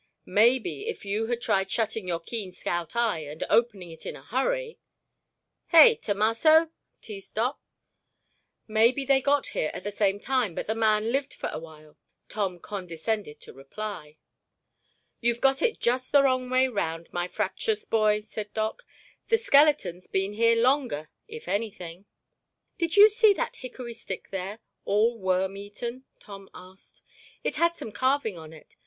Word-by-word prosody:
"Maybe 240 - +2
if 460 - -5
you 210 +3 -1
had 240 0 -2
tried 195 -4 +1
shutting 220 -2 -2
your 170 -2 -1
keen 195 +2 -5
scout 175 +1 -4
eye 230 -7 +1
and 150 0 -6
opening 210 -6 +1
it 160 - -12
in - - -6
a 135 - -13
hurry—— 465 - -2 0.9
Hey, 350 +8 +8
Tomasso?" 230 - +3 0.3
teased 200 -3 -9
Doc. 245 +6 -1 1.1
"Maybe 235 +5 +3
they 270 0 +3
got 285 +1 +1
here 155 - -1
at - - -7
the 205 - -3
same 200 -1 +1
time 250 -7 0
but - - -3
the 220 - -1
man 220 0 +2
lived 275 +1 -1
for - - -4
a - - -4
while," 155 -2 -14 0.3
Tom 195 -4 -2
condescended 185 -1 -4
to - - -12
reply. 155 +2 -8 1.0
"You've 235 0 0
got 270 +1 +2
it 460 -1 +1
just 250 +2 0
the 285 -1 +6
wrong 255 -2 +1
way 255 +1 +3
round, 165 -8 -4
my 175 0 -1
fraptious 200 +4 -2
boy," 215 -1 +2
said 210 -1 -7
Doc. 220 - -2 0.4
"The 455 - +4
skeleton's 280 - +3
been 195 +1 -1
here 230 +2 +4
longer, 240 - +1 0.2
if 460 +1 -10
anything." 200 -4 -4 0.7
"Did 335 0 0
you 415 +1 +11
see 435 -1 +4
that 475 +4 -3
hickory 250 -2 -8
stick 195 -5 -7
there—all 210 +3 -2
worm 190 0 0
eaten?" 235 +6 -7
Tom 195 -1 -12
asked. 185 +1 -15 0.4
"It - - -2
had 340 0 +2
some 225 - -8
carving 260 -1 0
on 160 -2 -10
it. 160 -2 -16
220 Hz, 160 wpm, -27 LUFS, 190-255 Hz, 1.1 s, you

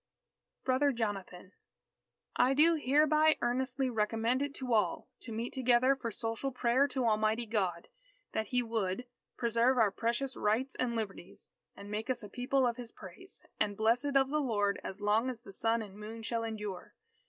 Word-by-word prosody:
_" - - -55
BROTHER 270 +2 +3
JONATHAN 195 -5 -4 0.9
_I 265 +2 +4
do 330 +3 +6
hereby 305 +3 +4
earnestly 260 +2 0
recommend 225 +2 0
it 285 0 -3
to 255 -3 -2
all... 215 -2 +1
to 235 - -9
meet 230 +2 -4
together 255 +1 +3
for 255 -3 -4
social 225 +5 -3
prayer 250 +2 +2
to 260 -2 -2
Almighty 220 +1 +2
God... 190 -6 -1 0.4
that 220 - -2
He 245 +1 +1
would... 225 -1 -2 0.3
preserve 235 +2 +2
our 220 -4 +4
precious 235 +5 -1
Rights 225 +6 0
and 240 -2 -1
Liberties... 195 -5 -6 0.2
and 200 +1 -10
make 215 +4 -3
us 250 -3 -1
a 205 - -8
People 255 +4 +1
of 240 -1 0
his 240 -2 -8
praise, 190 - -12 0.2
and 205 -1 0
blessed 240 +6 +2
of 270 0 +4
the 300 0 +1
Lord, 205 -6 0
as 195 +2 -7
long 215 +5 +2
as 240 -3 -6
the 195 - -12
sun 225 +2 0
and 200 -3 -11
the 205 - -13
moon 225 +2 -8
shall 230 0 -2
endure. 210 -5 -6
235 Hz, 180 wpm, -32 LUFS, 215-260 Hz, 0.9 s, do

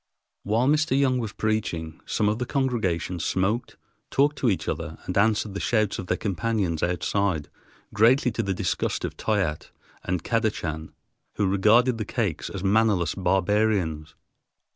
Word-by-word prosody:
While 115 +5 +1
Mr. 150 -1 +2
Young 130 -2 +2
was 110 -4 -3
preaching, 85 -9 -2
some 105 - +1
of 105 +2 0
the 125 - -2
congregation 110 - -1
smoked, 100 +8 -1 0.3
talked 145 +2 +2
to 125 - +2
each 95 - -1
other, 80 0 -4
and 90 - -4
answered 105 0 +2
the 100 - -4
shouts 110 -4 +1
of 95 - -6
their 90 - 0
companions 100 -4 -1
outside, 90 -1 0 0.4
greatly 125 +4 +4
to 115 - -2
the 100 -3 -2
disgust - - -1
of - - -5
Toyatte 95 -8 -1 0.3
and 90 -2 -2
Kadachan, 85 -9 -1 0.5
who 105 - +1
regarded 110 +6 +3
the 110 - -2
Kakes 105 - -2
as 100 -2 -6
mannerless 100 -4 +2
barbarians. 95 -5 0
105 Hz, 150 wpm, -25 LUFS, 90-115 Hz, 0.5 s, greatly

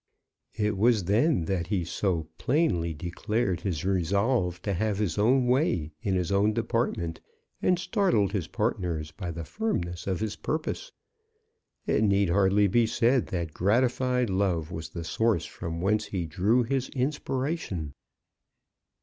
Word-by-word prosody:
It 105 -2 0
was 110 -2 +4
then 105 - +2
that 85 -2 -1
he 95 -3 -1
so 85 -2 -1
plainly 105 - +1
declared 90 +4 -2
his 90 -5 -2
resolve 95 +1 +1
to 100 - -1
have 105 +2 0
his 105 -3 -1
own 125 +4 +4
way 120 - +1
in 95 -2 0
his 90 -1 -1
own 100 +2 +3
department, 110 -8 -1 0.4
and 180 - +3
startled 180 - +1
his 95 -6 -2
partners 80 -4 -2
by 90 -4 -6
the 85 -1 -5
firmness 90 - -3
of 95 -2 0
his 105 -1 -2
purpose. 160 - -3 0.9
It 105 - +2
need 100 -2 +3
hardly 100 +2 +4
be 115 +4 +3
said 120 +3 +2
that 85 -4 -3
gratified 125 +4 +1
love 90 -4 0
was 80 -1 -5
the 85 +1 -6
source 105 +2 +1
from 85 0 -5
whence 105 +3 +1
he 90 -4 -3
drew 100 +10 +2
his 130 +2 -1
inspiration. 130 - -2
100 Hz, 145 wpm, -27 LUFS, 85-120 Hz, 0.9 s, was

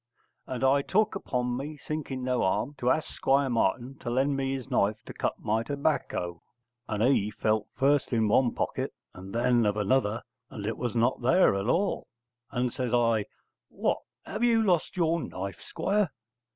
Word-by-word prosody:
And 130 -1 -4
I 135 +1 +4
took 215 +8 +1
upon 125 -9 -2
me, 145 +4 -5
thinking 140 -4 -4
no 125 -1 +1
harm, 105 +8 0
to 125 - +1
ask 155 - +1
Squire 135 -1 +2
Martin 120 +4 0
to 120 - -5
lend 135 +3 +1
me 135 0 -1
his 130 -3 -6
knife 105 +2 +2
to - - -8
cut - - -2
my 110 +2 0
tobacco. 140 - -2 0.5
And 110 -1 -1
he 120 -5 +3
felt 110 0 0
first 140 +1 +2
of 115 -2 +2
one 120 +3 +3
pocket - - -2 0.2
and 95 +1 -10
then 120 +1 +3
of 105 -1 +1
another 110 +1 +1 0.3
and 100 - -7
it 110 - -3
was 120 -2 -2
not 120 +3 +2
there 130 - +5
at 100 +2 -2
all. 190 +9 +1 0.4
And 125 -2 -1
says 125 -2 0
I, 115 -3 +2 0.4
'What! - - 0 0.3
have - - -3
you 230 -2 +4
lost 180 -2 +1
your 170 -1 +2
knife, 95 - -6
Squire?' 195 +3 0
125 Hz, 180 wpm, -28 LUFS, 110-140 Hz, 0.5 s, there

